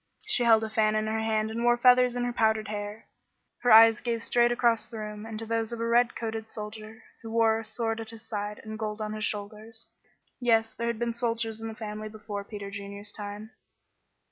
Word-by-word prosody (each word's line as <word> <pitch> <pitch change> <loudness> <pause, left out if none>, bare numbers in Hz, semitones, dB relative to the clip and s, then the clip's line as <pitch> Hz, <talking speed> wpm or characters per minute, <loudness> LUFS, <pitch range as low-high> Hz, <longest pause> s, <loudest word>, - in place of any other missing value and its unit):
She 425 -13 +2
held 225 -1 +6
a 220 - -3
fan 215 -1 +2
in 215 0 +1
her 220 +1 -1
hand 220 0 0
and 230 +1 -3
wore 240 0 +4
feathers 250 0 +5
in 245 - -1
her 245 0 -1
powdered 220 -2 +1
hair. 210 +1 -5 0.5
Her 245 - +2
eyes 225 0 +8
gazed 230 -1 -2
straight 240 0 +3
across 235 -2 +2
the 230 - -8
room 210 0 -6
into 225 0 -6
those 225 0 -1
of 235 - -5
a 230 - -1
red 235 +1 +3
coated 225 -1 -4
soldier 215 0 -8 0.2
who 225 - -8
wore 225 -1 +3
a - - -6
sword 225 0 -2
at 225 -1 -5
his 225 0 -9
side 210 -1 -4
and 220 0 -7
gold 215 -1 -3
on 215 0 -3
his 215 0 -2
shoulders. 215 +2 -5 0.5
Yes, 225 -3 +2
there 235 - -3
had 235 -1 -1
been 235 0 -1
soldiers 230 -2 -2
in 225 - -4
the 220 - -6
family 215 -1 -6
before 210 -1 -6
Peter 200 -1 -7
Junior's 200 +1 -7
time. 205 +1 -7
220 Hz, 220 wpm, -28 LUFS, 215-230 Hz, 0.5 s, eyes